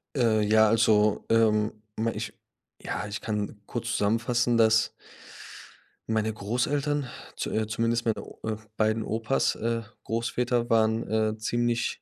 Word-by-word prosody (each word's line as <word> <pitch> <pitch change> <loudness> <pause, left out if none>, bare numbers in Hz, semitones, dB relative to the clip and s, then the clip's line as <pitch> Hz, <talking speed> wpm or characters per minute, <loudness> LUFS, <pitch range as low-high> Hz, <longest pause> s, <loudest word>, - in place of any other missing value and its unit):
Äh, 115 -4 +3
ja, 110 +1 +5
also, 105 -1 +3
ähm, 110 -1 +3 0.2
ma 115 +1 0
ich - - -5 0.5
ja, - - -3
ich 105 0 -5
kann 105 -1 -3
kurz 120 +1 -4
zusammenfassen, 115 +3 +1
dass 110 -1 +4 1.2
meine 110 0 0
Großeltern, 140 +7 -1 0.3
zu - - -3
äh, 110 0 0
zumindest 115 +2 0
meine 110 -2 0
O - - -14
äh, 110 -1 -2 0.2
beiden 110 +1 +1
Opas 115 +5 0
äh, 115 +1 -1 0.2
Großväter 120 +1 -1
waren, 110 0 +2
äh, 110 0 0
ziemlich 120 +1 -1
110 Hz, 135 wpm, -27 LUFS, 110-115 Hz, 1.2 s, ja